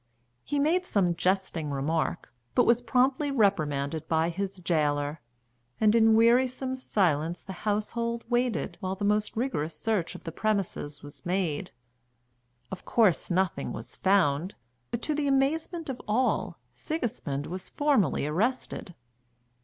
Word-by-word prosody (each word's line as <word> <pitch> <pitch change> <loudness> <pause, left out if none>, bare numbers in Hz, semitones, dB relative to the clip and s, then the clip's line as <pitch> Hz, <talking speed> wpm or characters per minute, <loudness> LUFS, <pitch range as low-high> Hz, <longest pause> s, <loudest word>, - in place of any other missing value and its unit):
He 290 - -2
made 320 +6 +2
some 195 - +1
jesting 180 -3 0
remark, 145 +2 -2 0.2
but 245 - +5
was 235 +1 +4
promptly 260 +4 +2
reprimanded 155 - +1
by 160 0 +2
his 190 +2 -4
gaoler, 150 -4 0 0.6
and 215 -1 +4
in 225 -1 +5
wearisome 255 +3 +3
silence 175 - 0
the 190 - -7
household 230 +4 -2
waited 240 -1 0
while 190 -1 -3
the 205 +1 -3
most 210 +1 +1
rigorous 165 - -2
search 210 -7 -1
of - - -10
the 165 - -5
premises 180 -7 -2
was 145 0 -11
made. 175 -4 -1 1.0
Of 190 - -6
course 210 - +2
nothing 185 0 0
was - - -6
found; 185 -3 +2 0.3
but, 235 - -4
to 305 - 0
the 295 -1 0
amazement 315 +5 0
of 265 -2 -5
all, 245 +5 +1 0.2
Sigismund 230 - -3
was 185 +2 -5
formally 270 - +2
arrested. 185 - -2
200 Hz, 135 wpm, -28 LUFS, 165-245 Hz, 1.0 s, but